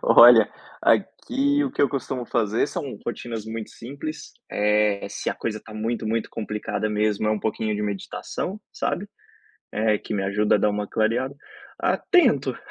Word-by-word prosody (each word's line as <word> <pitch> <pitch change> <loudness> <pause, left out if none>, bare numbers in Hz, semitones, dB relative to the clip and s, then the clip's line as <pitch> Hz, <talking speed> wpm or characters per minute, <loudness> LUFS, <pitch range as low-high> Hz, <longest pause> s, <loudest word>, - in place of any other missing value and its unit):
Olha, - - +8 0.3
aqui 285 +2 +2
o 270 - -2
que - - -4
eu 140 - +5
costumo 135 -2 -3
fazer 110 +1 +1
são 140 - -5
rotinas 115 -2 -4
muito 110 -1 -6
simples, 140 +6 -7 0.2
eh, 105 -1 +2
se - - -3
a - - -3
coisa 110 -2 -3
está 110 0 -13
muito, 110 +1 -2
muito 115 +1 -1
complicada 105 -1 -3
mesmo, 105 0 +1
é - - +3
um 110 - +1
pouquinho 110 0 -1
de 105 - -2
meditação, 105 - -4
sabe, 205 +3 -2 0.6
eh, 110 -1 +2
que 110 - -5
me 100 - 0
ajuda 100 +2 +2
a - - +4
dar 105 - +3
uma 105 0 -2
clareada, 120 +5 0 0.5
ah, - - +2
tento, 360 -3 +3
110 Hz, 170 wpm, -24 LUFS, 105-130 Hz, 0.6 s, Olha